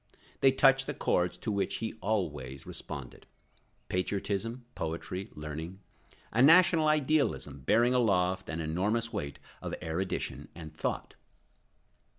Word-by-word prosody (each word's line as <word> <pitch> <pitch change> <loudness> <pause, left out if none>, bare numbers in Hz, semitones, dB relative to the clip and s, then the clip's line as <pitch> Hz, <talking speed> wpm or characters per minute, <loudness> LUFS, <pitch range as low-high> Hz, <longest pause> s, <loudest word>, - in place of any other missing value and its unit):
They 135 - +6
touch 135 0 +4
the 145 - -3
chords 90 -6 +1
to 110 - -3
which 100 -1 0
he 110 0 -3
always 75 - -2
responded—patriotism, 100 - -5
poetry, 85 +4 -4
learning, 80 +5 -6 0.5
a 115 - +2
national 165 +2 +7
idealism 150 - +1
bearing 115 - +3
aloft 95 -6 +2
an 80 +1 -3
enormous 105 +9 -1
weight 70 -1 -4 0.2
of - - -4
erudition 85 +4 -3
and 80 -2 -9
thought. 80 - -3
95 Hz, 115 wpm, -30 LUFS, 80-120 Hz, 0.5 s, national